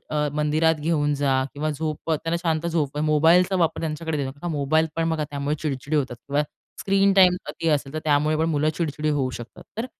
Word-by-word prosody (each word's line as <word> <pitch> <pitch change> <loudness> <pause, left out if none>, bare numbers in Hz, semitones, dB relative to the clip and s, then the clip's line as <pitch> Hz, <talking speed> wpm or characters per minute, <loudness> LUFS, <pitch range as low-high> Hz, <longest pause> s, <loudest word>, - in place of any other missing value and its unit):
अ, 150 -1 0
मंदिरात 155 +2 +2
घेऊन 150 -1 +1
जा 135 -2 +1
किंवा 155 +2 -2
झोप 155 +2 -4
त्यांना 165 +2 0
शांत 165 0 0
झोप 150 -4 -1
मोबाईलचा 165 +5 +4
वापर 170 -3 +1
त्यांच्याकडे 160 0 -3
देऊ 140 -2 -2
नका, 145 +6 -6
मोबाईल 155 +3 +2
पण 165 0 0
बघा, 155 -2 -1
त्यामुळे 140 +1 -2
चिडचिडी 145 +1 -2
होतात 130 -4 -1
किंवा 140 +5 -1 0.4
स्क्रीन 195 0 +3
टाईम 180 -1 +6
अती 165 - -3
असेल, 145 -2 0
तर - - -1
त्यामुळे 150 +1 +2
पण 160 +1 +1
मुलं 150 +1 +2
चिडचिडी 155 -2 -1
होऊ 130 -2 0
शकतात 120 +1 -10 0.2
तर 235 - -1
155 Hz, 200 wpm, -24 LUFS, 145-165 Hz, 0.4 s, टाईम